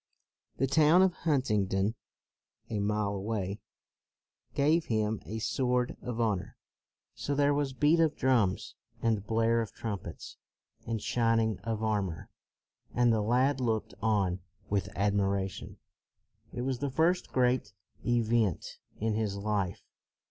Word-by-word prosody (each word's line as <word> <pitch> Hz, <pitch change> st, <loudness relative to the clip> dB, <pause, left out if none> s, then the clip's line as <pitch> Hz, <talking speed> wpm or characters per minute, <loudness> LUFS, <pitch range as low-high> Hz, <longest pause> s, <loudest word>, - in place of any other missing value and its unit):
The 135 Hz, -, +2 dB
town 155 Hz, +6 st, +5 dB
of 190 Hz, -2 st, +3 dB
Hunt 145 Hz, -9 st, 0 dB
ingdon, 100 Hz, 0 st, +1 dB, 0.8 s
a 105 Hz, -, -1 dB
mile 105 Hz, 0 st, 0 dB
away, 100 Hz, 0 st, -3 dB, 1.0 s
gave 155 Hz, +4 st, +3 dB
him 110 Hz, -1 st, 0 dB
a 110 Hz, -, -4 dB
sword 125 Hz, +2 st, 0 dB
of 120 Hz, -2 st, -4 dB
honor. 105 Hz, -6 st, -1 dB, 0.6 s
So 140 Hz, -, -3 dB
there 145 Hz, 0 st, +3 dB
was 140 Hz, -2 st, 0 dB
beat 150 Hz, +6 st, +3 dB
of 160 Hz, -2 st, +3 dB
drums, 115 Hz, -8 st, +1 dB, 0.3 s
and 110 Hz, -4 st, +1 dB
blare 115 Hz, +1 st, +2 dB
of 110 Hz, -, -5 dB
trumpets, 105 Hz, -5 st, -6 dB, 0.5 s
and 115 Hz, -1 st, -1 dB
shining 115 Hz, -2 st, +1 dB
of 110 Hz, +1 st, -3 dB
armor; 100 Hz, -6 st, -2 dB, 0.6 s
and 120 Hz, -1 st, +4 dB
the 110 Hz, -, +2 dB
lad 125 Hz, +5 st, +2 dB
looked 115 Hz, -4 st, -1 dB
on 100 Hz, -5 st, +1 dB, 0.3 s
with 100 Hz, -1 st, 0 dB
ad 100 Hz, +1 st, +2 dB
miration. 100 Hz, -1 st, -1 dB, 0.7 s
It -, -, -4 dB
was 130 Hz, -1 st, -1 dB
the 140 Hz, -, -1 dB
first 170 Hz, +6 st, +1 dB
great 125 Hz, -4 st, +2 dB, 0.3 s
event 115 Hz, -5 st, +1 dB, 0.2 s
in 110 Hz, 0 st, 0 dB
his 105 Hz, -2 st, -1 dB
life. 100 Hz, -3 st, -2 dB
115 Hz, 135 wpm, -30 LUFS, 105-130 Hz, 1.0 s, town